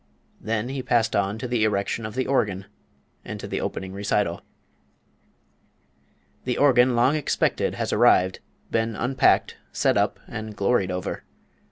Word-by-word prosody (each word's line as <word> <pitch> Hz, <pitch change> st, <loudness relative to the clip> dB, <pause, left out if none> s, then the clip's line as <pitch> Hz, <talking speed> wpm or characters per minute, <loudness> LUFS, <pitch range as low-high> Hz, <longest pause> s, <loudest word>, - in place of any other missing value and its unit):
Then 115 Hz, +2 st, -2 dB
he 135 Hz, 0 st, -3 dB
passed 120 Hz, -3 st, +1 dB
on 100 Hz, +1 st, 0 dB
to 125 Hz, +2 st, -5 dB
the 120 Hz, -2 st, 0 dB
erection 105 Hz, +1 st, -1 dB
of 110 Hz, -, -10 dB
the 130 Hz, -, 0 dB
organ, 100 Hz, -8 st, 0 dB, 0.6 s
and -, -, -7 dB
to -, -, -6 dB
the -, -, -3 dB
opening 95 Hz, 0 st, -4 dB
recital. 100 Hz, -3 st, -1 dB, 2.0 s
"The 125 Hz, -1 st, -2 dB
organ 125 Hz, -3 st, +4 dB
long 125 Hz, +5 st, +3 dB
expected 150 Hz, -, 0 dB
has -, -, -2 dB
arrived, 95 Hz, +1 st, +4 dB, 0.3 s
been 115 Hz, -1 st, 0 dB
unpacked, 130 Hz, +4 st, +2 dB
set -, -, +1 dB
up, -, -, +1 dB
and 110 Hz, -2 st, -7 dB
gloried 100 Hz, -1 st, +1 dB
over. 90 Hz, -1 st, -4 dB
110 Hz, 145 wpm, -24 LUFS, 100-125 Hz, 2.0 s, organ